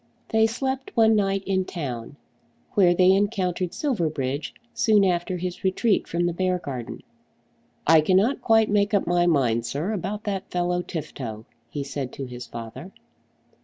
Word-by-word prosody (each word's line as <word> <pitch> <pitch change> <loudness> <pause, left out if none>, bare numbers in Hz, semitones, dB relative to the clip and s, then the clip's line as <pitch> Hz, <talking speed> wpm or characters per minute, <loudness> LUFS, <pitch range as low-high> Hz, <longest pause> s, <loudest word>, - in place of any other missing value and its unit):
They 220 0 +4
slept 265 +3 -3
one 225 -1 +6
night 195 -1 +1
in 190 -1 +1
town, 135 -9 -5 0.6
where 180 -3 +4
they 185 +1 +5
encountered 190 -3 0
Silverbridge 155 - -2 0.2
soon 220 -4 +4
after 180 0 0
his 180 0 -5
retreat 195 +3 +1
from 175 +1 0
the 175 - 0
Beargarden. 170 -9 -3 0.8
"I 160 0 +6
cannot 195 - +2
quite 225 -2 +4
make 205 0 +2
up 200 - +2
my 175 0 +2
mind, 125 -8 +2
sir, 150 - -2
about 210 +1 -3
that 195 -3 -3
fellow 180 0 0
Tifto," 130 -10 -6 0.2
he 145 +3 -4
said 135 -2 -4
to 135 - -5
his 125 -1 -8
father. 115 +11 -8
180 Hz, 150 wpm, -25 LUFS, 145-205 Hz, 0.8 s, one